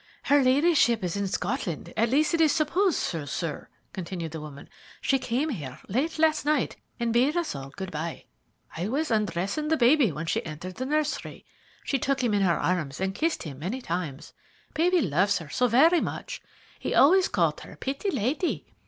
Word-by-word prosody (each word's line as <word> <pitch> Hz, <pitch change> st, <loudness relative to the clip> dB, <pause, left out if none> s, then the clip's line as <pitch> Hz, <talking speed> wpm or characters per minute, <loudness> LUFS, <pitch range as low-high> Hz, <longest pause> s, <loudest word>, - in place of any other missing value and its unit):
"Her 285 Hz, 0 st, +4 dB
ladyship 260 Hz, -, +3 dB
is 180 Hz, 0 st, -2 dB
in 200 Hz, -1 st, -1 dB
Scotland; 190 Hz, -, -3 dB
at 225 Hz, +1 st, +2 dB
least, 300 Hz, +6 st, +2 dB
it 335 Hz, -, +2 dB
is 315 Hz, -2 st, +5 dB
supposed 335 Hz, +4 st, +2 dB
so, 160 Hz, -5 st, -2 dB
sir," 150 Hz, +2 st, -4 dB, 0.2 s
continued 170 Hz, -3 st, -5 dB
the 160 Hz, -1 st, -6 dB
woman. 145 Hz, -2 st, -10 dB, 0.3 s
"She 270 Hz, -, +1 dB
came 255 Hz, +4 st, -1 dB
here 145 Hz, -, -5 dB
late 275 Hz, -, -1 dB
last 315 Hz, 0 st, +3 dB
night, 295 Hz, -3 st, +1 dB, 0.2 s
and 235 Hz, -1 st, 0 dB
bade 265 Hz, +8 st, +3 dB
us 345 Hz, -2 st, -1 dB
all 135 Hz, 0 st, -7 dB
good 190 Hz, +6 st, -7 dB
bye. 160 Hz, +2 st, -5 dB, 0.5 s
I 175 Hz, +4 st, -2 dB
was 285 Hz, +5 st, -1 dB
undressing 210 Hz, -, 0 dB
baby 255 Hz, -, +4 dB
when 155 Hz, +2 st, -5 dB
she 165 Hz, -, -1 dB
entered 165 Hz, +4 st, -7 dB
the 260 Hz, +2 st, -3 dB
nursery. 300 Hz, +1 st, -2 dB, 0.4 s
She 275 Hz, -, 0 dB
took 270 Hz, 0 st, 0 dB
him 235 Hz, -3 st, +1 dB
in 205 Hz, -, +2 dB
her 175 Hz, -4 st, +3 dB
arms 155 Hz, -7 st, -1 dB
and 190 Hz, 0 st, -1 dB
kissed 325 Hz, +11 st, -1 dB
him 140 Hz, -5 st, -8 dB
many 195 Hz, -, -3 dB
times. 170 Hz, -, -5 dB, 0.4 s
Baby 350 Hz, +2 st, +3 dB
loves 185 Hz, -, +2 dB
her 165 Hz, -, 0 dB
very 315 Hz, +9 st, +5 dB
much. -, -, -5 dB, 0.4 s
He -, -, -2 dB
always 360 Hz, +7 st, +6 dB
called -, -, +1 dB
her -, -, -11 dB
'Pitty 275 Hz, +9 st, -3 dB
lady.' 275 Hz, -, -1 dB
235 Hz, 185 wpm, -27 LUFS, -, 0.5 s, always